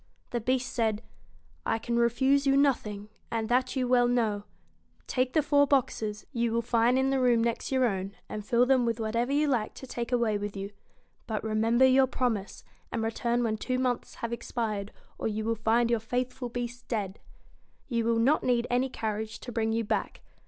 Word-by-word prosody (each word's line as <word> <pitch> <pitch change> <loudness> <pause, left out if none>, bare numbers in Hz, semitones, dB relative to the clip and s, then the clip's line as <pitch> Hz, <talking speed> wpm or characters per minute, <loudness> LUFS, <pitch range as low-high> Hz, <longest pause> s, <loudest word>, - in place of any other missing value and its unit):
The 240 - -1
Beast 255 +3 0
said: 220 -2 0 0.6
'I 225 - 0
can 235 +1 -1
refuse 265 +4 +3
you 275 0 +4
nothing, 210 -7 +1 0.2
and 225 -1 -2
that 255 +3 +1
you 255 -2 0
well 245 -1 +4
know. 220 -4 0 0.6
Take 255 0 0
the 310 - +3
four 285 0 +4
boxes; 220 -6 0
you 235 -2 0
will 235 +1 0
find 235 +2 +3
in 265 +1 +2
the 270 - +2
room 240 -2 +3
next 235 +2 -2
your 260 -1 +3
own, 195 -3 -2
and 210 - -5
fill 235 +3 +3
them 260 -1 +3
with 230 -1 -1
whatever 230 +3 -1
you 295 +2 +2
like 240 -6 0
to - - -9
take 240 -1 -5
away 230 -4 +1
with 205 0 -5
you. 195 +1 -5 0.6
But 215 -3 -2
remember 225 +3 +3
your 260 0 +5
promise, 235 -6 -2 0.3
and 225 - -2
return 235 +2 0
when 220 -2 0
two 255 +4 -2
months 250 -2 -1
have 235 0 -4
expired, 220 -4 -3 0.3
or - - -1
you 215 0 -2
will 230 - +1
find 230 +1 +2
your 235 - +3
faithful 250 +2 -3
Beast 245 0 -5
dead. 205 -4 -3 0.7
You 235 -3 0
will 230 0 +2
not 265 +7 +3
need 245 -1 +2
any 250 +2 +2
carriage 220 -2 -4
to 245 - -7
bring 225 -1 0
you 230 +1 0
back. 205 - -2
235 Hz, 195 wpm, -28 LUFS, 220-255 Hz, 0.7 s, your